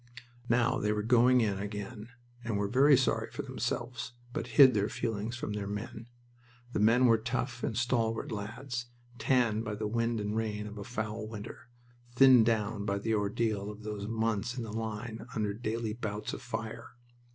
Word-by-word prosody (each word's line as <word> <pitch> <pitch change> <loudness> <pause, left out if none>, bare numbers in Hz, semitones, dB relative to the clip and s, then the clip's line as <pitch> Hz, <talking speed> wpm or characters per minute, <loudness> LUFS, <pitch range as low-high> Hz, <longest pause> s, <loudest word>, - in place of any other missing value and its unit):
Now 125 +2 +3
they 105 - +1
were 105 0 -1
"going 125 +2 +5
in" 100 -3 0
again, 105 +2 -6 0.3
and 115 -3 -1
were 100 0 0
very 135 +5 +6
sorry 135 - +1
for - - -5
themselves, 120 -1 -3 0.2
but 115 - -3
hid 135 -3 +9
their 105 0 +1
feelings 115 0 -3
from 115 -3 -4
their 105 -1 -3
men. 105 +2 -6 0.7
The - - 0
men 115 +4 +5
were 115 -2 +5
tough 120 +1 -3
and 110 - -1
stalwart 115 -2 0
lads, 120 +4 -4 0.3
tanned 120 -6 +2
by 105 -2 -3
the 105 +1 -3
wind 115 +1 0
and 105 +1 -2
rain 105 -2 -2
of 105 0 -7
a - - -5
foul 110 -2 -4
winter, 110 +1 -9 0.5
thinned 125 -3 +7
down 110 -2 0
by 100 -1 0
the 110 +3 -1
ordeal 105 0 0
of 105 0 -9
those 105 -1 -4
months 115 +1 -1
in 120 - -2
the 110 -2 -6
line 110 +1 -4
under 105 -2 0
daily 110 0 -3
bouts 105 -2 -4
of - - -6
fire. 115 -1 -6
110 Hz, 180 wpm, -31 LUFS, 105-120 Hz, 0.7 s, hid